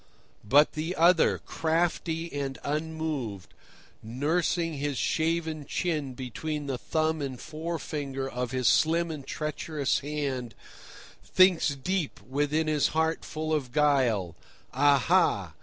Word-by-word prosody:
But 140 +8 +5
the 160 +4 -3
other, 170 +1 +4
crafty 165 0 -1
and 140 -2 -3
unmoved, 150 - -3 0.5
nursing 160 +6 -1
his 145 -2 -2
shaven 160 0 0
chin 150 -7 -2
between 145 +4 -4
the 135 -3 -3
thumb 160 0 0
and 130 -3 -4
forefinger 155 -4 -4
of 125 -1 -3
his 130 -2 0
slim 165 +1 +3
and 145 -4 -7
treacherous 150 -1 -2
hand, 140 -6 -3 0.7
thinks 180 -6 +4
deep 175 +3 -2
within 145 +4 0
his 150 -2 +2
heart 160 0 +1
full 155 0 -3
of 135 -5 -1
guile: 130 - +2 0.4
"Aha! 140 - +3
150 Hz, 115 wpm, -28 LUFS, 135-160 Hz, 0.7 s, But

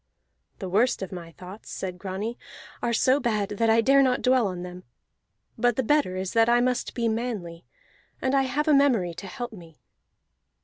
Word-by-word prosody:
"The 190 - -6
worst 210 +4 +1
of 190 - -7
my 170 -3 -8
thoughts," 190 +5 -11
said 180 -2 -5
Grani, 200 +5 -4 0.5
"are 235 - 0
so 255 +4 +3
bad 215 -6 -1
that 225 +2 0
I 225 +1 +5
dare 275 +4 +5
not 255 -2 +1
dwell 250 -3 +3
on 180 -2 -5
them. 180 0 -9 0.8
But 245 -2 +3
the 260 - 0
better 285 -7 +2
is 185 0 -3
that 225 0 +4
I 240 0 +5
must 250 0 -1
be 235 -1 0
manly; 220 -8 -3 0.5
and 260 0 -1
I 275 - +4
have 275 +4 -1
a 305 - +5
memory 245 -11 +3
to 175 +4 -8
help 245 -1 -6
me." 165 -6 -13
225 Hz, 190 wpm, -26 LUFS, 185-255 Hz, 0.8 s, I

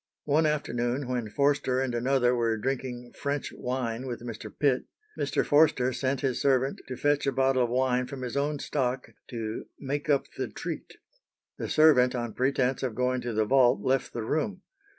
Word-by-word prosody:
One 155 +2 +3
afternoon, 125 -3 -1
when 125 -3 -2
Forster 140 0 +1
and 130 -2 -1
another 125 +1 +2
were 115 -2 +1
drinking 125 0 -4
"French 140 0 -3
wine" 125 -1 -3
with 120 -2 -5
Mr. 115 -3 -7
Pitt, 135 -4 +1 0.3
Mr. - - 0
Forster 145 -4 +4
sent 130 +1 -1
his 135 -3 -1
servant 135 -1 +2
to 130 - -5
fetch 145 -1 +1
a - - +3
bottle 135 -1 +2
of - - -4
wine 125 0 +1
from 130 0 -7
his 125 - -4
own 145 +1 0
stock 130 -2 -2 0.2
to 110 -2 -5
"make 145 +2 -3
up 140 -2 +3
the - - -1
treat." - - -7 0.6
The - - -3
servant 135 -5 +5
on 120 -2 -3
pretence 130 0 +1
of 125 -5 -2
going 125 0 0
to 120 -1 -3
the 110 0 +2
vault 125 -2 +4
left 130 +3 0
the 115 - -4
room. 190 - -2
130 Hz, 180 wpm, -28 LUFS, 120-140 Hz, 0.6 s, servant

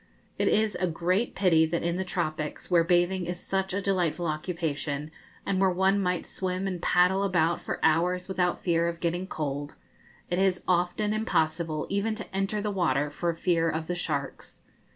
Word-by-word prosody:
It - - +2
is 215 -1 +2
a 185 - +1
great 180 +7 0
pity 175 -5 +4
that 170 +1 -2
in 170 0 0
the 190 - -1
tropics, 155 -3 -3
where 170 -2 +5
bathing 175 +1 +2
is 175 0 -4
such 190 0 -2
a 200 +1 -2
delightful 180 -3 0
occupation, 155 -2 -3 0.3
and 190 -1 0
where 190 - +5
one 190 +2 +2
might 180 -1 -1
swim 185 0 -2
and 180 -3 -3
paddle 180 +2 +3
about 175 -4 +1
for - - -4
hours 180 +3 +2
without 180 -2 0
fear 170 -1 +2
of 170 0 -3
getting 175 +2 -1
cold, 145 -3 -4 0.5
it 175 - -1
is 190 -1 +2
often 180 +4 +1
impossible 160 -7 0
even 205 +2 0
to 210 -3 -8
enter 195 +2 0
the 210 0 -1
water 150 -7 +1
for 170 +3 -1
fear 165 -1 +1
of 160 0 -2
the 175 - -2
sharks. 145 -6 -4
175 Hz, 180 wpm, -28 LUFS, 165-190 Hz, 0.5 s, where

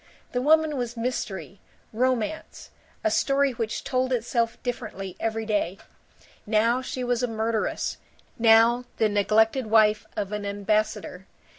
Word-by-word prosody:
The 245 - -1
woman 310 +1 +3
was 240 -1 -4
mystery, 215 -5 -4 0.3
romance, 255 +4 -2 0.3
a 325 - +2
story 275 -2 +2
which 225 -3 -3
told 260 -1 0
itself 235 -1 0
differently 215 -6 -5
every 225 0 -2
day; 205 -4 -1 0.7
now 230 +4 +2
she 255 0 -4
was 245 -1 0
a 250 - +1
murderess, 225 -1 -2 0.4
now 230 +2 +5
the 220 - +3
neglected 220 +4 +2
wife 215 -1 +4
of 200 -1 -2
an 210 -1 -3
ambassador. 205 -1 -2
225 Hz, 130 wpm, -25 LUFS, 215-250 Hz, 0.7 s, now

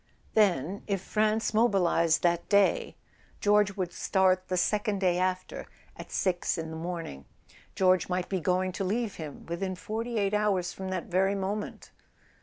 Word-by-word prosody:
Then, 195 -3 +2
if 200 -2 0
France 215 +3 0
mobilised 185 -7 +3
that 170 -1 +1
day, 210 - +3 0.4
George 205 -1 +3
would 180 -2 -2
start 185 -1 +2
the 185 - -1
second 210 +3 +1
day 180 -2 +2
after, 185 0 -2 0.3
at - - -10
six 180 -1 0
in 160 -1 -4
the - - -6
morning. 165 - -5 0.5
George 185 -1 +3
might 180 0 -1
be 190 - -1
going 185 +3 0
to 195 +2 -4
leave 215 +2 -2
him 155 -3 -8
within 185 +3 -3
forty 225 +5 -4
eight 200 -1 +1
hours 205 -4 +1
from 190 0 -6
that 185 -2 -3
very 190 +2 +1
moment! 200 +2 -4
190 Hz, 160 wpm, -28 LUFS, 180-205 Hz, 0.5 s, mobilised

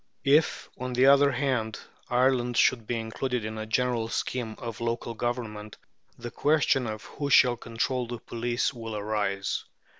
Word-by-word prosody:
If, 150 +3 +3
on 125 0 -3
the 125 +2 +4
other 140 +1 +7
hand, 125 -5 -1 0.3
Ireland 125 -1 +2
should 115 -4 +3
be 120 - -1
included 115 +1 -3
in 110 0 -5
a 110 - -5
general 120 0 0
scheme 115 -2 -3
of 115 -3 -7
local 115 0 -2
Government, 110 -3 -4 0.4
the 120 0 -7
question 145 -4 +2
of 110 0 -5
who 145 -1 -5
shall 125 -3 +6
control 120 +2 -2
the 120 +1 -5
police 120 +3 -2
will 115 -3 -6
arise. 100 -2 -1
120 Hz, 155 wpm, -27 LUFS, 110-125 Hz, 0.4 s, other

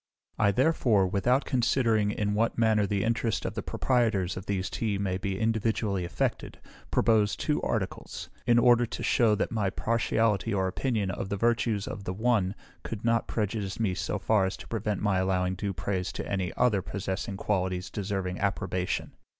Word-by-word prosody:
I 105 - +4
therefore, 115 -4 +3
without 120 +8 +1
considering 115 -4 +2
in 105 0 -1
what 115 +2 +1
manner 110 -3 +3
the 100 -1 0
interest 115 0 0
of - - -2
the - - -3
proprietors 110 -8 +1
of 95 +1 -7
these 95 -2 -1
teas 105 -4 -2
may 95 -2 -1
be 95 -1 -2
individually 110 -4 0
affected, 85 - -2 0.3
propose 105 -2 +3
two 150 - -1
articles, 100 -5 -3 0.2
in 120 - +5
order 120 0 +5
to - - -6
shew 115 -3 +3
that - - -1
my 105 -4 0
partiality 115 0 +1
or 95 -2 +1
opinion 105 0 -1
of 95 - -4
the 100 - -2
virtues 115 -2 +1
of 100 - -6
the 90 - -2
one 105 -2 +1 0.3
could 115 0 -6
not 115 0 +2
prejudice 105 -3 -2
me 105 -5 +1
so 90 +2 -2
far 105 -4 +2
as 95 - -4
to - - -11
prevent 105 -3 -2
my 100 -3 +2
allowing 95 -1 +1
due 100 +2 -3
praise 90 +1 -2
to - - -5
any 95 -2 -1
other 105 -6 +3
possessing 95 +1 -4
qualities 95 -2 -1
deserving 95 -3 -3
approbation. 95 -2 -1
105 Hz, 175 wpm, -28 LUFS, 95-115 Hz, 0.3 s, in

